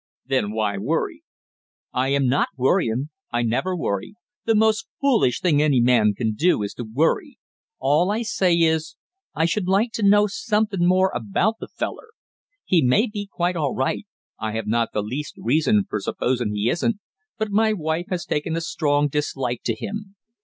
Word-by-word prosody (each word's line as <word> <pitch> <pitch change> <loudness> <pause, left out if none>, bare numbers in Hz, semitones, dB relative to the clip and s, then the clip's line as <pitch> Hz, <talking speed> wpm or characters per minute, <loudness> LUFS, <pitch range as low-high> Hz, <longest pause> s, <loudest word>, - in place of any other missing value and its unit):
"Then 130 -6 0
why 105 -2 -1
worry?" 145 +11 -2 0.7
"I 130 +1 +1
am 140 -1 +2
not 135 +3 +2
worryin' 130 -1 +1 0.2
I 120 0 0
never 180 +11 0
worry 100 - -3 0.3
the 225 - +3
most 220 +1 +2
foolish 235 - +2
thing 155 -5 +3
any 145 -4 +3
man 115 -4 +4
can 110 -1 0
do 135 -1 +2
is 100 - -4
to 120 - -6
worry. 150 +8 0 0.4
All 150 +7 +2
I 220 +3 0
say 185 -6 +2
is 160 -1 +1 0.4
I 160 +1 +2
should 180 +3 -1
like 200 +5 +2
to 225 - -4
know 205 +1 +5
somethin' 210 -3 0
more 185 +1 +3
about 120 - 0
the - - -7
feller. - - -5 0.6
He 175 -3 +3
may 130 - +4
be 205 -3 -6
quite 175 0 -1
all 150 -5 -1
right 130 +10 -1 0.3
I 110 -1 -3
have 110 -1 -3
not 115 +2 0
the 105 - -1
least 135 +7 -5
reason 160 - +2
for 105 - -2
supposin' 120 +1 -1
he 105 +2 0
isn't 185 - +1 0.4
but 220 -2 -2
my 220 +2 +3
wife 165 -3 -2
has 180 -2 -3
taken 160 +2 -2
a 165 - -1
strong 145 -3 +1
dislike 135 -4 -2
to 115 - 0
him. 205 - -6
155 Hz, 180 wpm, -23 LUFS, 120-195 Hz, 0.7 s, know